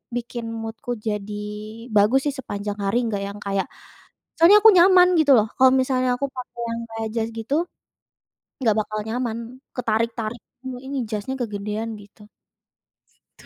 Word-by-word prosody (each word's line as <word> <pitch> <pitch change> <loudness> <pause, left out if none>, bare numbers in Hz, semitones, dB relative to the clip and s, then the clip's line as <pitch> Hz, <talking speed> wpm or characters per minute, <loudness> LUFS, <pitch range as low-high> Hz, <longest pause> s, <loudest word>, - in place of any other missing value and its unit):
bikin 240 0 -4
mood-ku 225 +3 -6 0.2
jadi 210 0 -3 0.5
bagus 210 +6 +5
sih - - -4
sepanjang 205 -4 -5
hari 200 +4 +1
enggak 205 -3 -2
yang 200 +1 -8
kayak 195 -1 0 0.7
soalnya 350 +6 +8
aku 445 - +10
nyaman 360 0 +7
gitu 290 -3 +5
loh 215 - +3
kalau 260 0 +6
misalnya 255 -1 +1
aku 280 - -1
pakai 245 -1 -8
yang 230 0 -3
kayak 225 0 -4
jas 225 -1 -1
gitu, 225 +5 -2 1.1
enggak 225 -4 +3
bakal 215 0 -5
nyaman, 235 0 -2 0.4
ketarik-tarik 230 -1 -1 0.5
ini 275 +1 -5
jasnya 215 +5 -3
kegedean 210 0 -3
gitu. 205 +1 -18 1.1
Tu - - -17
225 Hz, 145 wpm, -23 LUFS, 210-255 Hz, 1.1 s, aku